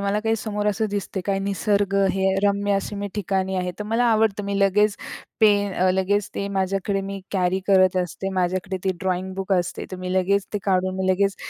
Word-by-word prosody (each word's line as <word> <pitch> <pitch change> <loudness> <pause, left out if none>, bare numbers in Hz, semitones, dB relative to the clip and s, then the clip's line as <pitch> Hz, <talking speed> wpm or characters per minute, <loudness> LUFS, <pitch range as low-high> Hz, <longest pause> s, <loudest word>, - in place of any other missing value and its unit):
मला 200 +1 0
काही 225 +1 +1
समोर 210 -1 -3
असं 210 +1 +1
दिसते. 200 -1 -3
काय 195 -1 +1
निसर्ग 200 0 0 0.2
हे 190 0 +1
रम्य 200 0 +1
अशी 195 +1 -2
मी 200 0 -3
ठिकाणी 190 -1 -1
आहे, 180 0 -1
तर 210 - -4
मला 225 +3 +1
आवडतं. 220 -3 +2
मी 200 0 -2
लगेच 205 +1 +3 0.4
पेन 205 -2 +4
अ, 185 0 +2
लगेच 190 +2 +1
ते 200 - -2
माझ्याकडे 195 +1 0
मी 195 0 -5
कॅरी 185 -1 +1
करत 185 -2 +4
असते. 180 +2 -5
माझ्याकडे 185 +1 -1
ते 190 - +2
ड्रॉइंग 185 0 -2
बुक 195 +1 -3
असते. 180 -2 0
तर 185 - -5
मी 180 0 -4
लगेच 190 +2 +1
ते 210 - 0
काढून 185 -1 +1
मी 190 0 -1
लगेच 195 +1 +1
195 Hz, 205 wpm, -23 LUFS, 185-205 Hz, 0.4 s, पेन